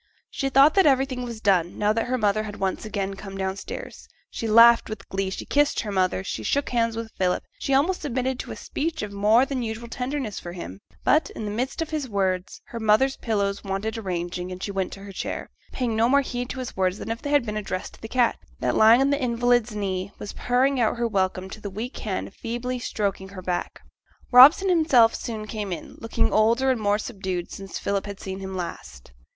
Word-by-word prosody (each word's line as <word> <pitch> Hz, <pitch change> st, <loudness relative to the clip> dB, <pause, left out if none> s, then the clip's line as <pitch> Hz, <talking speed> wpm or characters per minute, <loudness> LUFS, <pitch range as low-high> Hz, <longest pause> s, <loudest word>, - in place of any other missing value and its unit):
She 275 Hz, -, -1 dB
thought 275 Hz, +3 st, +6 dB
that 385 Hz, -5 st, +5 dB
everything 265 Hz, -2 st, +2 dB
was 235 Hz, -3 st, -6 dB
done, 180 Hz, -4 st, +2 dB
now 210 Hz, +1 st, +2 dB
that 225 Hz, +2 st, -1 dB
her 255 Hz, +1 st, 0 dB
mother 215 Hz, -2 st, +2 dB
had 210 Hz, -1 st, -6 dB
once 195 Hz, +2 st, -2 dB
come 195 Hz, 0 st, -4 dB
downstairs 190 Hz, 0 st, -5 dB
again; -, -, -35 dB
she 230 Hz, -, -4 dB
laughed 230 Hz, +2 st, +7 dB
with 215 Hz, -2 st, -7 dB
glee; 195 Hz, 0 st, -1 dB
she 190 Hz, -, -6 dB
kissed 290 Hz, 0 st, +2 dB
her 210 Hz, -, -5 dB
mother; 185 Hz, -1 st, +1 dB
she -, -, -4 dB
shook 285 Hz, 0 st, 0 dB
hands 230 Hz, -2 st, +1 dB
with 230 Hz, -1 st, -5 dB
Philip, 180 Hz, -1 st, +1 dB, 0.2 s
she 275 Hz, -, +1 dB
almost 340 Hz, +7 st, +2 dB
submitted 260 Hz, -2 st, -2 dB
to -, -, -6 dB
a -, -, -5 dB
speech 320 Hz, -3 st, -3 dB
of 210 Hz, -, -5 dB
more 215 Hz, +5 st, +4 dB
than 270 Hz, -2 st, -3 dB
usual 230 Hz, 0 st, -4 dB
tenderness 250 Hz, -2 st, -3 dB
from 175 Hz, 0 st, -8 dB
him; 95 Hz, -, -7 dB, 0.2 s
but, 310 Hz, -, +3 dB
in 220 Hz, -, -5 dB
the 205 Hz, -, -3 dB
midst 255 Hz, +9 st, -2 dB
of 320 Hz, -, -10 dB
his 300 Hz, -5 st, -2 dB
words, 190 Hz, -2 st, -1 dB
her 230 Hz, -, -5 dB
mother's 220 Hz, +5 st, +3 dB
pillows 200 Hz, -3 st, -1 dB
wanted 200 Hz, +3 st, -3 dB
arranging 180 Hz, -3 st, -4 dB
and 185 Hz, +1 st, -7 dB
she 200 Hz, -, -3 dB
went 195 Hz, -1 st, -2 dB
to 195 Hz, -, -10 dB
her 200 Hz, 0 st, -9 dB
chair, 190 Hz, -, -5 dB, 0.2 s
paying 245 Hz, -4 st, -1 dB
no 225 Hz, +2 st, +3 dB
more 280 Hz, +2 st, +5 dB
heed 245 Hz, -2 st, -4 dB
to -, -, -5 dB
his 255 Hz, -2 st, -5 dB
words 185 Hz, 0 st, +1 dB
than -, -, -5 dB
if 230 Hz, -, -4 dB
they 290 Hz, -, -4 dB
had 290 Hz, -4 st, +3 dB
been 210 Hz, -1 st, -4 dB
addressed 195 Hz, -3 st, -4 dB
to -, -, -17 dB
the 225 Hz, -, -6 dB
cat, 245 Hz, 0 st, +1 dB, 0.2 s
that -, -, 0 dB
lying 225 Hz, +3 st, +7 dB
on 275 Hz, +1 st, +3 dB
the 285 Hz, 0 st, 0 dB
invalid's 240 Hz, -2 st, +1 dB
knee 195 Hz, -1 st, -2 dB
was 205 Hz, -, -7 dB
purring 255 Hz, +2 st, +1 dB
out 230 Hz, 0 st, +1 dB
her 235 Hz, 0 st, +1 dB
welcome 190 Hz, -3 st, -1 dB
to 215 Hz, +3 st, -10 dB
the 205 Hz, -, -5 dB
weak 220 Hz, +7 st, -6 dB
hand 195 Hz, -2 st, -4 dB
feebly 245 Hz, +2 st, -4 dB
stroking 200 Hz, -4 st, -2 dB
her 195 Hz, -1 st, -9 dB
back. 180 Hz, -1 st, -3 dB, 0.5 s
Robson 280 Hz, +10 st, +9 dB
himself 295 Hz, -10 st, +5 dB
soon 220 Hz, -2 st, -5 dB
came 210 Hz, -2 st, -5 dB
in, 175 Hz, -, -6 dB
looking 225 Hz, -, 0 dB
older 235 Hz, +5 st, +3 dB
and 245 Hz, -4 st, -1 dB
more 205 Hz, 0 st, +2 dB
subdued 190 Hz, -5 st, -4 dB
since 195 Hz, -1 st, -7 dB
Philip 200 Hz, 0 st, -2 dB
had 200 Hz, -1 st, -7 dB
seen 190 Hz, 0 st, -6 dB
him 190 Hz, -1 st, -5 dB
last. 65 Hz, -, -7 dB
220 Hz, 225 wpm, -25 LUFS, 195-250 Hz, 0.5 s, Robson